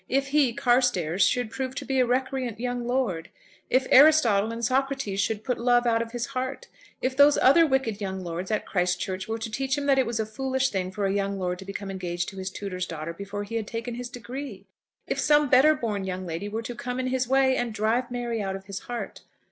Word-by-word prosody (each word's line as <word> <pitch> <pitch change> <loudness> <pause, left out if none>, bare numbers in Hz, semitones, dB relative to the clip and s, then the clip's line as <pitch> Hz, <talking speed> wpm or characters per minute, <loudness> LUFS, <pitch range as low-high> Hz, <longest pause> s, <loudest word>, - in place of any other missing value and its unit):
If 275 +1 +1
he, 280 -3 +3
Carstairs, 230 -9 +2
should 245 -3 -1
prove 260 0 -4
to - - -5
be 270 -1 0
a 250 - +3
recreant 255 -2 -1
young 245 0 -3
lord! 225 -10 -1 0.4
If 260 0 +3
Aristotle 255 -8 +6
and 230 0 -3
Socrates 265 -5 0
should 210 +1 -1
put 250 - -2
love 245 0 +3
out 230 -1 +2
of 230 0 -5
his 240 0 -2
heart! 260 - -4 0.4
If 260 0 0
those 285 +1 +6
other 325 +5 +6
wicked 265 -7 0
young 190 -1 -4
lords 175 +2 -5
at 215 - -1
Christ 180 -1 0
Church 190 0 -4
were 225 0 -2
to 225 0 -5
teach 270 +4 -1
him 285 - -2
that 275 -1 +4
it 260 - +2
was 230 -1 -2
a 220 - 0
foolish 265 +3 -1
thing 185 -2 -2
for 200 +2 -3
a 195 - +1
young 200 0 -1
lord 180 -1 -2
to 190 - -9
become 200 0 -5
engaged 180 -2 -3
to 195 - -12
his 190 0 -3
tutor's 185 -2 -5
daughter 165 0 -5
before 200 +3 -5
he 205 - -9
had 220 -2 -4
taken 230 +2 -4
his 245 +1 -5
degree! 255 +3 -7 0.4
If - - -2
some 295 -1 +4
better 285 +5 +6
born 215 -7 -2
young 185 0 -4
lady 170 +4 -4
were 220 +2 -4
to 245 - -5
come 250 +1 -4
in 255 - -1
his 255 -1 0
way 265 0 +3
and 245 -2 -1
drive 225 +4 0
Mary 240 -2 -3
out 195 -1 -2
of 195 0 -9
his 195 -1 -6
heart! 240 -1 -5
235 Hz, 235 wpm, -26 LUFS, 195-260 Hz, 0.4 s, Aristotle